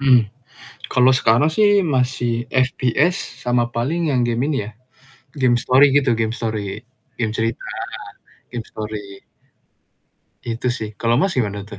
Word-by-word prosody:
Hmm. 125 -5 +5 0.6
Kalau 125 +1 +4
sekarang 130 +3 +3
sih 205 +2 +4
masih 125 -5 -1
FPS 130 +6 +1 0.3
sama 120 -1 +1
paling 160 +8 -1
yang 125 -2 +2
game 120 +3 0
ini 150 -3 0
ya, 110 - -8 0.7
game 125 -2 +4
story 130 +3 +4
gitu, 135 -4 +3
game 110 0 -1
story. 105 -4 -4 0.3
Game 110 -3 -1
cerita, 115 0 -2 0.9
game 120 -2 -6
story. 105 -2 -7 1.2
Itu 115 +1 -4
sih, 110 -3 -5
kalau 115 0 +1
Mas, 195 - +1
gimana 105 -3 -1
tuh? 100 -1 -11
120 Hz, 140 wpm, -20 LUFS, 110-130 Hz, 1.2 s, Hmm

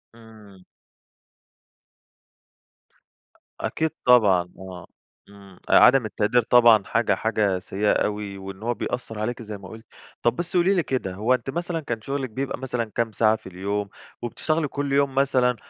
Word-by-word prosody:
إمم. 105 -5 -17 3.0
أكيد 160 0 -1 0.2
طبعًا، 100 -8 +5
آه، 95 -2 -10 0.4
إمم 100 -2 -16
عدم 130 -3 +6
التقدير 110 +3 +1
طبعًا 115 -3 +5
حاجة 105 0 +1
حاجة 105 -4 0
سيئة 100 +3 -1
أوي، 105 -1 -2
وإن 95 +1 -9
هو 120 +1 0
بيأثَّر 120 -2 -5
عليكِ 120 +3 -3
زي 105 -2 -7
ما 95 -1 -12
قُلتِ. 110 +2 -12 0.4
طَب 120 - +2
بس 175 +1 -3
قولي 180 +3 +3
لي 175 - +1
كده، 125 -8 -3
هو 110 +6 +1
أنتِ 130 - -2
مثلًا 170 +3 -3
كان 120 -7 -5
شغلِك 135 +2 -3
بيبقى 130 +5 -4
مثلًا 125 -3 -2
كام 115 -1 0
ساعة 110 +1 +3
في 100 - -11
اليوم، 100 +2 -3 0.3
وبتشتغلي 155 +6 -1
كُلّ 140 0 -3
يوم 140 -1 +2
مثلًا 130 -3 +2
115 Hz, 150 wpm, -24 LUFS, 100-130 Hz, 3.0 s, عدم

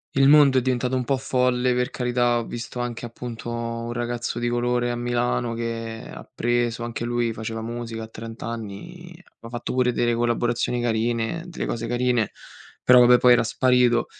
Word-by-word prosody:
il 135 0 +5
mondo 145 -3 +7
è - - -2
diventato 125 0 0
un 130 -1 -1
po' 135 +3 +1
folle, 125 -1 +1
per 125 0 0
carità 120 -1 +1
ho 115 - -2
visto 120 +2 -6
anche 120 -1 -4
appunto 120 0 -7
un 115 0 -4
ragazzo 120 0 -3
di 120 0 -1
colore 120 0 0
a - - -2
Milano, 120 0 -1
che 115 -1 -4
ha - - -9
preso 120 0 -1
anche 120 0 -4
lui 120 -1 0
faceva 110 0 -5
musica 115 -1 -5
a - - -7
trent'anni, 115 - -8 0.2
aveva 115 - -14
fatto 120 - -4
pure 125 -1 +2
delle 120 0 +1
collaborazioni 120 +1 0
carine 115 +6 -1
delle 175 - -5
cose 115 0 -3
carine, 120 -3 +1 0.5
però 125 0 +7
vabbè 125 0 +7
poi 125 0 +6
era 120 - +4
sparito. 125 0 +3
120 Hz, 180 wpm, -24 LUFS, 115-125 Hz, 0.5 s, mondo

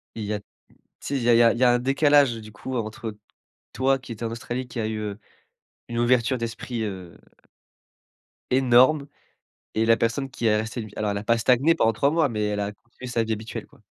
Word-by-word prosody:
et 110 - -5
il - - -3
y 105 - -2
a 105 - -2
tu - - -25 0.6
sais, 140 - -3
il 125 - -2
y 120 - 0
a - - +6
il - - +5
y - - +6
a 115 - +6
il 115 - -5
y 130 - +4
a 120 - +6
un 120 - +3
décalage 140 0 +4
du 110 -1 -10
coup, 130 +5 -6
entre 110 -1 -5 0.6
toi, 135 +1 +2
qui 125 - -11
étais 115 +1 -7
en 115 - -3
Australie, 120 +2 -5
qui 120 - -6
a 110 - -1
eu, 110 -1 -3
heu, 105 0 -5 0.7
une 120 - -4
ouverture 125 +1 +2
d'esprit 115 0 -4
heu 95 -4 -6 1.3
énorme! 130 +3 +4 0.7
Et 110 +1 +1
la 115 0 +5
personne 130 +4 -1
qui 120 - -3
est 105 -1 +4
restée 110 +1 -3
alors 105 -1 -1
elle 100 - -2
a 105 - -7
pas 115 +1 +2
stagné 130 +7 +4
pendant 115 -8 +2
3 140 +6 +1
mois, 160 -2 +2
mais 105 -3 -2
elle 105 0 -1
a 100 +1 -2
continué 120 +4 -13
sa 120 -2 0
vie 110 - -2
habituelle 110 +1 -5
quoi. - - -23
115 Hz, 240 wpm, -24 LUFS, 110-130 Hz, 1.3 s, a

